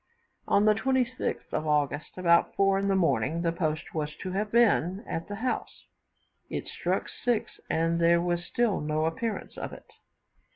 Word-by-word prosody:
On 205 - +4
the 215 - +6
26th 255 +2 -1
of 155 - -1
August, 150 +1 0
about 170 -2 +3
4 195 0 +3
in 200 - -1
the 195 - +2
morning, 170 -2 +1
the 165 - +2
post 155 -3 -2
was 150 -1 -3
to 185 - -6
have 205 +2 -2
been 210 -4 +3
at 165 - -4
the 205 - -5
house; 250 +5 -3 0.6
but - - -2
it - - -6
struck - - -2
6, 240 -3 -2
and 165 +1 +1
there 170 0 +5
was 175 0 -1
still 230 +2 0
no 155 +1 0
appearance 210 +7 -3
of - - -5
it. - - -11
180 Hz, 175 wpm, -28 LUFS, 165-210 Hz, 0.6 s, the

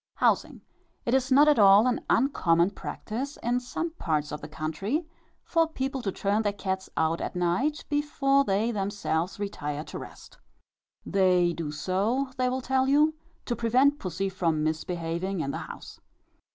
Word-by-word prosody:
HOUSING. - - +1 0.4
It 235 - 0
is 265 0 +1
not 285 +3 +7
at 295 -5 +5
all 200 +2 +7
an 250 -1 0
uncommon 180 -9 +3
practice, 255 +7 -5
in 245 +1 +1
some 325 +7 -4
parts 150 -3 -1
of 150 0 -5
the - - -7
country, 195 - -3 0.4
for 330 -1 +2
people 270 -3 -3
to 200 - -2
turn 205 +3 0
their 205 -2 0
cats 190 -1 -3
out 160 +1 +1
at - - -4
night, 180 - 0
before 285 -2 +2
they 210 +1 +1
themselves 195 -4 -2
retire 150 -7 -4
to - - -8
rest. - - -12 0.7
They 180 -3 +3
do 165 -3 -4
so, 195 - -1
they 255 -1 +1
will 260 +1 -2
tell 265 +1 +1
you, 300 +3 +4 0.3
to 240 - -1
prevent 255 +6 +3
pussy 185 +1 -2
from 170 -5 0
misbehaving 170 +3 -2
in 140 -3 -1
the - - -4
house. - - -10
205 Hz, 165 wpm, -27 LUFS, 175-265 Hz, 0.7 s, not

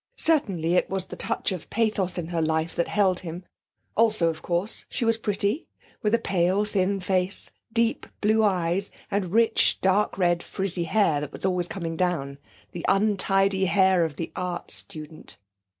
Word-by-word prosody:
Certainly 195 - +2
it 180 - +2
was 190 -1 -2
the - - -8
touch - - -2
of 185 -3 -6
pathos 210 -5 0
in 170 -2 -4
her 170 -2 -1
life 160 +1 0
that 170 - 0
held 190 -3 +2
him; 175 +1 -7 0.5
also, 215 -6 +3
of 160 -1 -5
course, 180 +5 -2
she 235 - -2
was 230 0 +3
pretty, 205 - -1 0.3
with 215 -1 +3
a - - +3
pale 195 -1 +1
thin 195 -1 0
face, 185 0 -1 0.2
deep 230 0 0
blue 215 +1 +3
eyes, 185 -1 +1 0.2
and 195 -3 -1
rich 225 +1 +3
dark 195 +2 +2
red 175 -2 +2
frizzy 185 -2 -2
hair 165 -5 +2
that 150 -1 -5
was - - -6
always 180 -2 +1
coming 165 -4 -4
down 150 -6 -1 0.3
the 170 - -7
untidy 195 -1 +2
hair 190 -2 +4
of 160 -3 -2
the 165 - -5
art 180 -1 -4
student. 155 0 -6
185 Hz, 170 wpm, -25 LUFS, 170-205 Hz, 0.5 s, hair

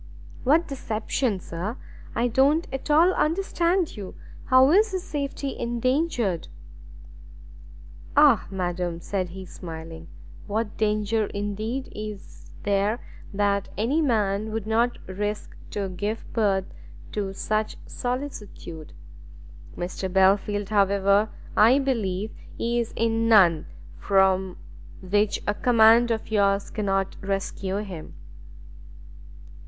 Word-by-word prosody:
"What 315 +6 +3
deception, 225 -4 -2
sir? 185 +8 -5 0.4
I 240 - +2
don't 275 +7 +3
at 270 +3 -5
all 330 +5 +5
understand 345 +1 +1
you. 195 -3 -8 0.3
How 260 +2 +6
is 420 +3 +4
his 370 -1 -2
safety 280 -1 -4
endangered?" 240 - 0 1.7
"Ah - - +6
madam!" 180 -2 -2
said 185 +1 -3
he 190 +2 -8
smiling, 165 -2 -9 0.4
"what 215 0 -2
danger 215 0 +1
indeed 215 +6 -4
is 210 -2 -8
there 205 +3 +1 0.3
that 200 -1 0
any 255 +10 +1
man 215 -5 +1
would 220 -1 -3
not 230 +2 +1
risk 205 +3 -4
to 200 -2 -3
give 205 +5 -3
birth 195 -4 +2 0.5
to 200 -2 -2
such 215 +2 -2
solicitude! 230 - -6 0.8
Mr 185 +1 -4
Belfield 195 +1 +2
however, 200 0 +3 0.3
I 230 +5 +6
believe 220 -7 -1 0.2
is 235 0 -1
in 230 0 +1
none 180 -8 +5 0.3
from 190 -1 +2 0.4
which 205 +3 +1
a 205 - +1
command 230 +1 +5
of 225 -1 -2
yours 200 -2 +2
cannot 195 -3 -1
rescue 195 0 -2
him." 180 -6 -9
210 Hz, 105 wpm, -25 LUFS, 195-240 Hz, 1.7 s, How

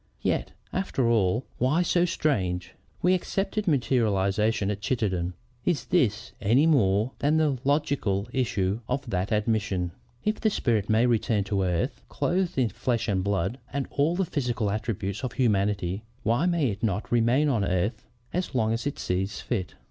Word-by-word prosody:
Yet, - - 0 0.2
after 160 -10 0
all, 115 +1 +2
why 145 +8 +3
so 175 0 +3
strange? 90 - -1 0.3
We 180 +1 +5
accepted 195 +3 -1
materialization 110 - +2
at 105 0 -5
Chittenden. 95 -7 -1 0.3
Is 175 -4 0
this 120 - +1
any 115 +9 +4
more 110 -6 +3
than 150 +2 +2
the 150 -5 +2
logical 140 -9 +1
issue 105 -6 0
of 130 +2 -2
that 95 +1 -1
admission? 105 -5 0 0.3
If 215 0 0
the 220 - +3
spirit 115 - 0
may 110 +2 +4
return 115 -3 +2
to 100 0 -1
earth, 90 -3 -1
clothed 180 0 0
in 125 -4 +3
flesh 120 +4 -1
and 95 -3 +1
blood 100 +4 -1
and 140 -1 -1
all 150 +5 +2
the 190 +1 +1
physical 120 -9 -1
attributes 105 -2 -3
of 130 -1 -3
humanity, 100 -5 +1 0.2
why 120 +10 +2
may 170 -7 +2
it 100 +1 -7
not 105 -2 -1
remain 120 +5 +3
on 120 -8 +1
earth 100 +6 -1 0.3
as 180 -5 -2
long 110 -2 +2
as 115 +5 -2
it 145 - -3
sees 95 +2 -2
fit? 100 -7 -3
115 Hz, 165 wpm, -27 LUFS, 100-140 Hz, 0.3 s, We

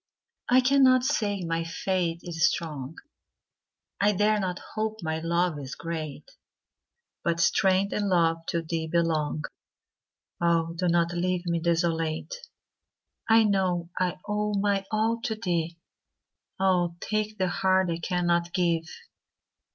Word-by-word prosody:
I 255 +1 +6
cannot 260 -1 +5
say 205 -6 0
my 165 0 -1
faith 170 0 -2
is 170 -1 +2
strong,I 165 +6 -5
dare 210 +2 +2
not 185 -2 -2 0.2
hope 220 0 -2
my 160 0 -1
love 170 -1 0
is 135 -2 -7
great; 165 - -6 0.9
But 170 0 0
strength 190 +3 +3
and 205 -1 0
love 165 -2 +2
to 170 -1 -1
thee 160 0 -3
belong; 155 -2 0 1.0
Oh, 165 -1 +2
do 180 +1 -1
not 170 0 +2
leave 180 +1 -1
me 170 -1 0
desolate!I 170 - -1
know 185 -4 0
I 180 0 0
owe 210 0 -1
my 200 -1 +1
all 225 +2 0
to 220 - -1
thee; 170 -5 -2 0.8
Oh, 180 -3 +2
take 215 +1 -2
the 185 -2 +1
heart 190 -1 +2
I 165 - -2
cannot 175 -1 0
give! 170 -3 +1
175 Hz, 125 wpm, -27 LUFS, 165-200 Hz, 1.0 s, I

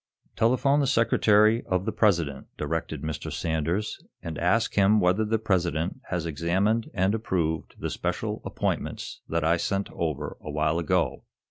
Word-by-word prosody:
"Telephone 130 +5 +3
the 140 - +2
secretary 110 -2 +4
of 90 0 0
the 110 - 0
President," 85 -12 +1
directed - - -3
Mr. 80 -1 -4
Sanders, 85 +6 -2 0.2
"and 80 -2 -5
ask 110 +7 +2
him 105 +2 +4
whether 90 +4 +3
the 110 +1 +1
President 90 -5 -1
has 90 -3 -2
examined 95 +8 0
and 95 +1 +2
approved 85 -7 -1
the - - -4
special - - -3
appointments - - -3
that 85 -1 0
I 85 +2 +3
sent 100 +3 -2
over 75 -3 -3
a - - -7
while 75 +2 +1
ago." 85 -5 0
90 Hz, 150 wpm, -26 LUFS, 80-110 Hz, 0.2 s, secretary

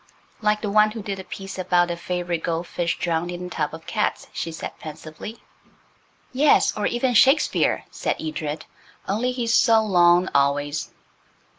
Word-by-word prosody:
"Like 210 0 +1
the 205 - -1
one 215 +1 +5
who 220 -1 -7
did 195 -1 -4
the - - -6
piece 195 0 -8
about 175 -1 +2
the 175 - -1
favourite 175 -1 -3
gold 165 +1 -2
fish 175 0 -2
drowned 170 0 -1
in 175 0 -5
a - - -6
tub 150 -3 -2
of 160 0 -13
cats," 210 -1 -1
she 165 - -4
said 160 - -6
pensively. 155 +7 -9 0.9
"Yes, 285 +3 +4
or 210 - 0
even 245 +1 0
Shakespeare," 270 +6 +4
said - - -2
Edred; 155 -1 -4 0.4
"only 225 +6 0
he's 240 -2 -1
so 225 -3 +5
long 175 -3 +4
always." 145 +2 +1
180 Hz, 165 wpm, -23 LUFS, 165-215 Hz, 0.9 s, one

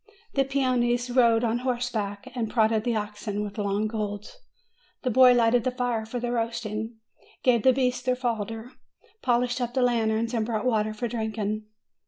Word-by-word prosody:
The 270 -1 +2
peones 250 -2 0
rode 235 -2 +5
on 235 0 +1
horseback, 240 -4 -2
and 235 -4 -2
prodded 220 -1 +2
the 240 -2 +1
oxen 210 0 -3
with 205 +1 -6
long 200 +1 0
goads. 210 - -4 0.7
The 255 - 0
boy 255 +2 +7
lighted 235 0 +3
the 255 - +1
fire 245 -3 -2
for 245 +2 -4
the 240 0 -2
roasting, 225 -1 -3 0.5
gave 240 -3 +4
the 260 - +6
beasts 250 -1 0
their 255 0 +1
fodder, 225 -1 -3 0.5
polished 245 0 +1
up 240 0 -3
the 260 - +3
lanterns, 230 -1 +1
and 225 -2 +1
brought 220 0 -2
water 215 -3 +1
for 240 +3 -2
drinking. 220 -2 -3
230 Hz, 170 wpm, -26 LUFS, 215-245 Hz, 0.7 s, boy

